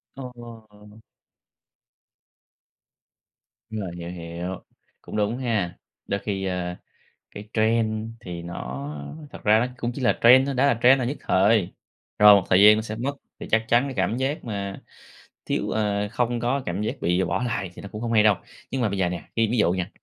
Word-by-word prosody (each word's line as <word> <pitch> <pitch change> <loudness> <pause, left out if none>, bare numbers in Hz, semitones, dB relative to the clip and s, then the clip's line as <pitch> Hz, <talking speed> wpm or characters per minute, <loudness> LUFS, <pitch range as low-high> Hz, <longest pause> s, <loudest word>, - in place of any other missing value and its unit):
Ồ. 115 -5 -12 2.7
Đúng 110 -1 -4
rồi, 95 -3 -5
hiểu, 85 0 -7
hiểu. 85 +1 -6 0.4
Cũng - - -9
đúng 105 +3 0
ha, 105 -9 -1 0.3
đôi 100 - -1
khi, 95 -2 -3
ơ, 90 -1 -3 0.6
cái 105 +1 -10
trend 110 0 +1
thì 90 -5 -7
nó 70 -5 -6 0.4
thật - - -11
ra 110 +1 +5
nó 125 - +1
cũng 120 0 -2
chỉ - - -5
là 120 - +2
trend 130 +3 +7
thôi, 140 - -2
đã 130 +2 +3
là 120 -5 +2
trend 130 +2 +7
là 125 - -1
nhất 140 +5 -3
thời, 100 0 +2 0.5
rồi 105 -1 +9
một 100 - +3
thời 95 +1 +5
gian 105 +1 +9
nó 110 - -1
sẽ 110 0 -6
mất. 135 +5 -3 0.2
Thì - - -7
chắc 110 0 +3
chắn 120 +2 +4
cái 135 - -4
cảm 120 -2 0
giác 135 +4 -2
mà 100 -3 -5 0.6
thiếu - - -1
ờ, 105 -1 0
không 120 0 0
có 125 +4 0
cảm 90 +3 -3
giác 105 - -2
bị 90 +2 +2
bỏ 90 - -1
lại 95 -7 -2
thì - - -11
nó 100 - -8
cũng 105 - -7
hông 115 -1 -2
hay 110 -1 +5
đâu. 105 -3 +5 0.4
Nhưng 135 - -1
mà 115 - +1
bây 100 - -3
giờ 90 -2 +1
nè, 90 - -5
ví 115 -1 +2
ví 120 - 0
dụ 90 -5 +3
nha, 90 0 -2
105 Hz, 200 wpm, -24 LUFS, 95-120 Hz, 2.7 s, rồi